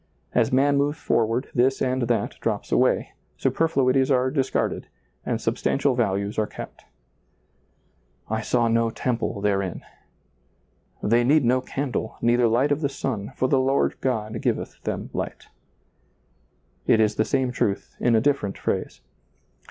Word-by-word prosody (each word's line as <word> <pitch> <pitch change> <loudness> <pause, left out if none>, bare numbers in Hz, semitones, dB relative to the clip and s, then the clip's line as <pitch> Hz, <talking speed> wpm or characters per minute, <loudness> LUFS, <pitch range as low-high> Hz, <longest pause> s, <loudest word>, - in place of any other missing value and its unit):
As - - +2
man 140 +2 +3
moves 145 +2 +1
forward, 115 -2 0
this 130 +2 +2
and 130 0 0
that 120 -1 0
drops - - -2
away, - - +2 0.3
superfluities 135 -5 +2
are 130 -1 +2
discarded, 135 -2 -1 0.4
and - - 0
substantial 140 -1 0
values 100 -3 -1
are 105 - +1
kept, - - -10 0.7
" - - -41
I 110 0 -1
saw 120 +1 +1
no 115 0 +2
temple 115 -3 -2
therein 100 -3 -1 0.4
"; 60 0 -41
" 105 - -8
They 120 +1 +5
need 140 +2 +4
no 130 +2 +3
candle, 130 -4 -3
neither 120 0 +3
light 125 +6 +2
of 145 +2 +1
the 140 - +1
sun, 125 -7 -4
for 130 - +1
the 135 0 +3
Lord 135 +1 +2
God 110 -4 -2
giveth - - -2
them - - -3
light" - - -5 1.4
It 110 - +5
is 110 -1 +3
the 110 - +1
same 130 +2 0
truth 100 -5 -2
in 120 -2 +3
a 110 - +4
different 135 -7 0
phrase. - - -3
125 Hz, 150 wpm, -24 LUFS, 110-135 Hz, 1.4 s, They